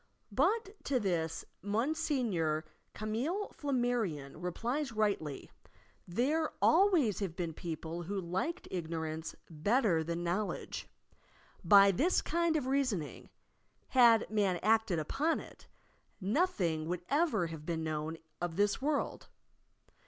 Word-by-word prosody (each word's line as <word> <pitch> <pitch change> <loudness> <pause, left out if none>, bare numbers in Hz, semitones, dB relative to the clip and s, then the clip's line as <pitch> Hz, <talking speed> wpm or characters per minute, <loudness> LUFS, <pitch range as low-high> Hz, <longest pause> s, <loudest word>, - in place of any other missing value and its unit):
But 435 -2 0
to 265 -3 +1
this 170 -6 -1 0.2
Monsieur 220 - 0 0.3
Camillc 255 - -2
Flammarion 240 - -1
replies 240 - -2
rightly; 200 -10 -1 0.6
"There 285 - +1
always 325 - +4
have 190 -5 -3
been 170 -2 -3
people 165 0 -5
who 195 +4 -3
liked 190 - -3
ignorance 160 -2 -4
better 175 - +2
than 170 +1 -3
knowledge. 185 +5 -2 0.8
By 200 +2 +8
this 305 - +2
kind 340 0 +1
of 295 -5 0
reasoning 255 - -1 0.6
(had 235 -3 +6
man 200 -4 +2
acted 220 -3 +3
upon 280 - 0
it) - - -13 0.5
nothing 190 - 0
would 175 0 -3
ever 280 - +2
have 160 -2 -7
been 160 0 -2
known 155 +1 -3 0.2
of 175 -2 -2
this 205 +5 +1
world. 290 +1 -1
205 Hz, 115 wpm, -33 LUFS, 165-270 Hz, 0.8 s, By